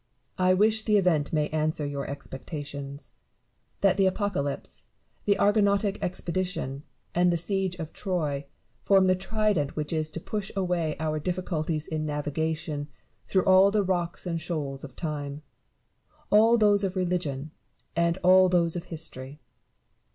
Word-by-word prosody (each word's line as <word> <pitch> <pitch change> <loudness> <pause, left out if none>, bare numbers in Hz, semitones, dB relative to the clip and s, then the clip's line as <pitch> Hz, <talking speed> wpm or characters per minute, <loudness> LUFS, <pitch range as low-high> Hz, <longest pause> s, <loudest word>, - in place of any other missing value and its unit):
Barrow. 185 0 +2
I - - +6
wish 215 +3 +3
the 215 -1 +3
event 165 -7 +2
may 150 -2 +1
answer 155 -1 -1
your 140 -1 -4
expec 140 -2 -7
tations; 145 -2 -6 0.7
that 195 -1 +4
the 195 -1 +4
Apocalypse, 185 -8 -2 0.4
the 200 - +4
Argonautic 205 -1 +2
Expedition, 175 -6 -2 0.3
and 175 0 +3
the 170 - +1
Siege 190 +1 -1
of 160 -3 -7
Troy, 150 -8 -2 0.3
form 195 -1 +4
the 185 - +5
trident 200 -6 0
which 150 +1 -3
is 155 -1 0
to 165 - -5
push 205 +3 -4
away 175 -5 0
our 155 -1 -1
difficulties 160 -2 -2
in 155 -1 -3
navigating 150 +1 -2 0.4
through 190 -2 +2
all 190 +1 +7
the 205 0 +2
rocks 175 -2 -2
and 165 -2 -2
shoals 145 -5 -4
of 135 -4 -9
time 145 -3 -4 0.4
— 305 0 -37
all 225 +3 +6
those 205 -2 +4
of 190 -1 -1
religion, 170 -6 -2 0.4
and 170 +1 +2
all 185 +1 +7
those 170 -2 +2
of 175 0 -4
history. 150 -4 -6
170 Hz, 150 wpm, -27 LUFS, 150-190 Hz, 0.7 s, all